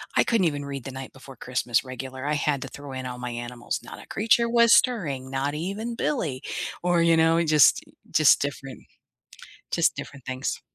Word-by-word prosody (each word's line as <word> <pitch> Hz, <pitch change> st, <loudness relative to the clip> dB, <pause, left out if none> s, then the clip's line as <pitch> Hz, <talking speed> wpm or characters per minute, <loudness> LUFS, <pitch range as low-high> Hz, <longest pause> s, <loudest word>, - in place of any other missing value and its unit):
I -, -, +5 dB
couldn't 225 Hz, -6 st, +2 dB
even 145 Hz, -2 st, -3 dB
read 140 Hz, -2 st, -6 dB
The 135 Hz, -, -5 dB
Night 130 Hz, 0 st, -8 dB
Before 135 Hz, 0 st, -13 dB
Christmas 125 Hz, -1 st, -1 dB
regular. 130 Hz, +1 st, -7 dB
I 150 Hz, +1 st, 0 dB
had 145 Hz, -2 st, 0 dB
to 135 Hz, -, -5 dB
throw 145 Hz, -1 st, -9 dB
in 130 Hz, -1 st, -5 dB
all 125 Hz, 0 st, -6 dB
my 125 Hz, 0 st, -4 dB
animals, 120 Hz, 0 st, -4 dB
"Not -, -, -10 dB
a -, -, -19 dB
creature 230 Hz, +2 st, +2 dB
was 235 Hz, -1 st, +5 dB
stirring, 155 Hz, -, +2 dB
not 135 Hz, +2 st, -2 dB
even 200 Hz, +9 st, -4 dB
Billy." 160 Hz, -, -2 dB, 0.4 s
or, 175 Hz, -1 st, +3 dB
you 165 Hz, -1 st, +4 dB
know, 165 Hz, +1 st, +4 dB
just 155 Hz, -4 st, +5 dB
i -, -, -19 dB, 0.2 s
just 155 Hz, -3 st, +5 dB
different 135 Hz, -2 st, -5 dB, 0.9 s
just -, -, +2 dB
different 140 Hz, -4 st, -9 dB
things. 130 Hz, +1 st, -3 dB
140 Hz, 195 wpm, -25 LUFS, 130-170 Hz, 0.9 s, I